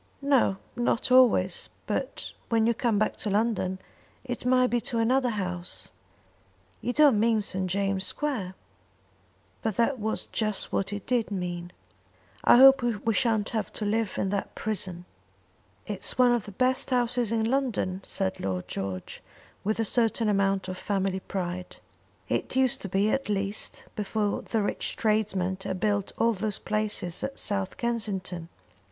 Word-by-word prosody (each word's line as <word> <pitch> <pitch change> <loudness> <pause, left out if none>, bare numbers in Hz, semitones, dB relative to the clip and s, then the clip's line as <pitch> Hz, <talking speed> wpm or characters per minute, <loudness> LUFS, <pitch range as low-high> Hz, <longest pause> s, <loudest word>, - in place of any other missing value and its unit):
"No, 270 -8 +3 0.2
not 240 0 0
always; 235 -8 +4 0.2
but - - -3 0.2
when 225 -1 +3
you 235 - +3
come 230 -2 +1
back 215 - 0
to 210 - -3
London 200 -3 0 0.5
it 245 -1 -4
may 255 0 +5
be 240 -1 +1
to 235 - -3
another 250 +3 +2
house." 180 -5 -4 0.9
"You 245 - -1
don't 285 -5 +5
mean 220 -1 +3
St. 190 -1 0
James' 195 0 +1
Square?" 225 -12 -2 1.1
But 220 -3 -1
that 235 +4 +1
was 220 +1 -2
just 215 -3 -1
what 195 - 0
he 205 - -3
did 245 -3 +1
mean. 175 -3 -4 0.7
"I - - +7
hope 270 +1 +8
we 230 -2 0
shan't 220 -3 +1
have 220 -2 -2
to 215 - -3
live 215 0 0
in 195 - 0
that 200 0 -3
prison." 185 -5 -3 0.8
"It's 205 -3 -2
one 250 -1 +6
of 240 -3 +1
the 205 - -8
best 255 +6 +1
houses 245 -2 +1
in 225 -1 +1
London," 225 -7 0
said 190 -1 -2
Lord 95 -2 -3
George, 95 -2 -5 0.4
with 215 +2 -1
a 225 - +2
certain 225 0 +1
amount 195 -2 +1
of 185 0 -5
family 195 -2 -1
pride. 180 -1 -4 0.5
"It - - -1
used 260 -1 +2
to 195 - -4
be, 200 +3 +2
at 270 -4 -1
least, 200 +1 -1
before 210 0 -1
the 225 -3 -1
rich - - -2
tradesmen 195 -4 0
had 185 - -3
built 205 -1 0
all 230 0 +3
those 210 0 -2
palaces 210 -5 -1
at 275 - -4
South 200 -2 -2
Kensington." 195 -8 -2
215 Hz, 160 wpm, -27 LUFS, 190-235 Hz, 1.1 s, hope